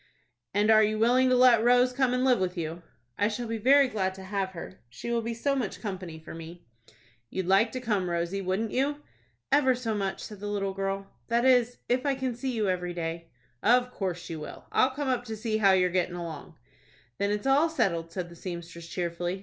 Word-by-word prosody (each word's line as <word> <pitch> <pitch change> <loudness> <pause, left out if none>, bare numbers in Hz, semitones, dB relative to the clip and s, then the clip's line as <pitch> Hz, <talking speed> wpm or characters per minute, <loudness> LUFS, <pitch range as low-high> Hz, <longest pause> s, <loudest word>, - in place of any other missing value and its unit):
"And 205 +2 +3
are 220 0 +7
you 215 0 +1
willing 250 +4 +4
to 255 - +4
let 245 -3 +6
Rose 245 +1 +4
come 260 -1 +2
and 250 +1 +1
live 250 -4 +4
with 185 0 -2
you?" 165 +1 -4 0.4
"I 205 - +3
shall 225 +3 -3
be 225 0 -3
very 275 +4 +6
glad 190 -5 -2
to 190 - -10
have 190 0 -2
her. 180 +2 -9
She 125 - -6
will 235 -1 +1
be 230 +1 -4
so 275 +5 0
much 210 -8 -3
company 185 -5 -6
for 160 - -10
me." 165 +1 -10 0.6
"You'd 190 -1 -3
like 195 +5 +4
to 255 - -3
come, 210 -7 -1
Rosie, 170 +3 -1
wouldn't 195 +4 -1
you?" 290 +3 -1 0.5
"Ever 265 -2 +4
so 240 -3 -2
much," 195 -2 -2
said 210 -2 -9
the 205 - -5
little 195 -1 -1
girl; 195 0 -2 0.2
"that 235 +1 +1
is, 245 -2 +4
if 250 +1 +1
I 280 -1 +1
can 260 -2 -2
see 255 +3 -3
you 220 -4 0
every 180 -1 -2
day." 165 0 -4 0.3
"Of 250 +2 +3
course 180 -5 -4
you 165 -2 -5
will. 150 - -9
I'll 255 - +4
come 280 +2 -4
up 250 -2 0
to 220 -2 -5
see 215 0 -1
how 200 -3 +5
you're 180 -1 +3
gettin' 180 -1 0
along." 165 -4 -7 0.6
"Then 200 - +1
it's 210 +2 -2
all 280 +5 +4
settled," 170 - 0
said 180 -1 -4
the 170 - -12
seamstress, 170 -1 -7
cheerfully. 175 +1 -3
205 Hz, 220 wpm, -28 LUFS, 180-245 Hz, 0.6 s, are